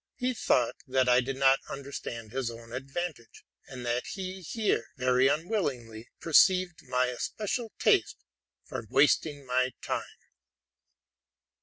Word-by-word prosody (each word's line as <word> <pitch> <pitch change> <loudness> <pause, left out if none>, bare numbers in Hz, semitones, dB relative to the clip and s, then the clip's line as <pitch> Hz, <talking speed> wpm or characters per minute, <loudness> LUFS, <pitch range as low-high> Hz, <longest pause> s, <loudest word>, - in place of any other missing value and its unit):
He 255 0 -1
thought 125 - +2
that 130 -1 +2
I 125 0 +5
did 135 +2 -3
not 135 0 +5
understand 120 -5 -6
my 135 - -1 0.2
own 115 0 -13
advantage, 135 0 -6 0.2
and 125 -2 -8
that 120 +1 -1
he 190 -1 -5
here 215 +5 -1
— - - -40
very 130 +1 +3
unwillingly 135 - -2
— - - -54
perceived 175 +1 +4
my 125 0 +2
especial 210 - -3
taste - - +3 0.5
for - - -6
wasting 145 -3 +3
my 130 0 +1
time. - - -4
135 Hz, 135 wpm, -29 LUFS, 125-175 Hz, 0.5 s, I